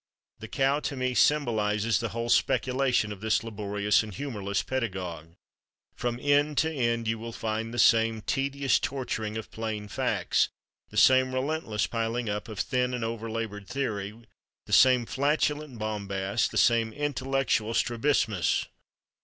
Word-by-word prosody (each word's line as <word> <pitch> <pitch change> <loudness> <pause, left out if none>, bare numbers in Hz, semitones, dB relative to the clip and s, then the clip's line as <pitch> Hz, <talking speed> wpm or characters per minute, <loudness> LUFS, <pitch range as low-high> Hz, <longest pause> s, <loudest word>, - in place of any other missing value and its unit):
The - - -8
cow, 135 +2 +1
to 145 - -4
me, 130 -1 -1
symbolizes 110 -7 +2
the 115 - -2
whole 115 0 -4
speculation 125 -4 +2
of 105 -1 -8
this 110 0 +1
laborious 105 -2 0
and 110 -1 -7
humorless 105 -5 -3
pedagogue. 90 -10 -4 0.6
From 120 -1 -2
end 145 +1 +2
to 160 +1 +2
end 115 -4 0
you 115 0 -1
will 115 +1 -6
find 110 0 -3
the 120 - -6
same 115 -1 +4
tedious 140 +1 0
torturing 110 -5 -3
of 110 - -7
plain 110 -2 -4
facts, 100 - 0 0.4
the 105 - -8
same 130 +3 +5
relentless 130 -6 -1
piling 115 0 -2
up 105 0 -3
of 110 - -8
thin 125 +3 0
and 120 - -3
over 115 0 -4
labored 110 -3 -5
theory, 110 -5 -3 0.5
the - - -6
same 125 -2 +6
flatulent 145 0 0
bombast, 100 -1 -1
the - - -5
same 115 -2 +3
intellectual 135 -5 -1
strabismus. 115 - +1
115 Hz, 145 wpm, -28 LUFS, 105-130 Hz, 0.6 s, same